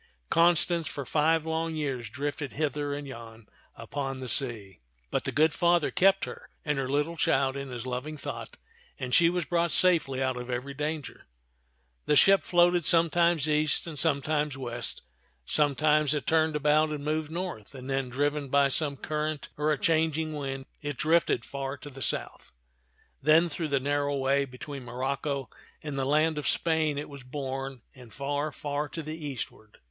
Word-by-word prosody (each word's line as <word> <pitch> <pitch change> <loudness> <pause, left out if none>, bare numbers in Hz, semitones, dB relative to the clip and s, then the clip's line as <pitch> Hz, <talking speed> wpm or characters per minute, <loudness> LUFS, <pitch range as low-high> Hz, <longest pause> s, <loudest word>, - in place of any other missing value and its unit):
Constance 170 0 +4
for 140 - -5
five 160 +3 +2
long 160 0 -1
years 135 -7 -3
drifted 145 +3 -4
hither 145 -1 -1
and 145 0 -4
yon 115 -3 -10 0.3
upon 135 +3 -4
the 130 - -6
sea; 110 - -1 0.3
but - - -1
the - - -1
good 155 +1 +3
Father 175 -2 +2
kept 195 +1 +4
her - - -10 0.2
and 150 -2 0
her 130 -1 -2
little 145 +4 0
child 135 -3 +2
in 140 -1 -5
his 120 -1 -6
loving 130 +5 -4
thought, - - -7 0.4
and 125 -1 -5
she 170 +4 +6
was 175 -1 -1
brought 170 +2 +1
safely 165 -8 +4
out 130 -1 0
of 125 0 -6
every 125 +3 -3
danger. 150 -1 -4 0.8
The 150 - +4
ship 195 +6 +6
floated 175 0 +3
sometimes 170 -1 +3
east 150 0 +1
and 160 -4 -4
sometimes 150 -2 +1
west; 120 -2 -5 0.4
sometimes 150 - +3
it 145 - -3
turned 160 -1 +2
about 150 +1 +3
and 150 -1 -5
moved 155 0 -1
north, 170 - -5
then, 135 -1 -3
driven 145 +2 -1
by 140 0 +4
some 145 0 +1
current 150 +1 -3
or 150 +1 +1
a 150 - +1
changing 160 0 +1
wind, 135 -2 -4 0.2
it 145 -3 -4
drifted 155 -6 +2
far 140 0 -4
to 145 +1 -10
the 135 0 -10
south. - - -2 0.7
Then 160 +4 +5
through 160 +1 -3
the 140 -2 +1
narrow 145 +1 0
way 140 +1 +2
between 135 +1 -8
Morocco 135 +2 -3 0.3
and 150 -2 -4
the 135 -1 -1
land 155 +2 +2
of 140 - -3
Spain 160 -3 +1
it 145 - -4
was 140 -1 -10
borne, 135 -1 -5
and 125 -4 -14
far, 145 +4 -2
far 145 0 -3
to 165 - -6
the 155 +1 -7
eastward. 120 -6 -7
145 Hz, 175 wpm, -28 LUFS, 135-155 Hz, 0.8 s, she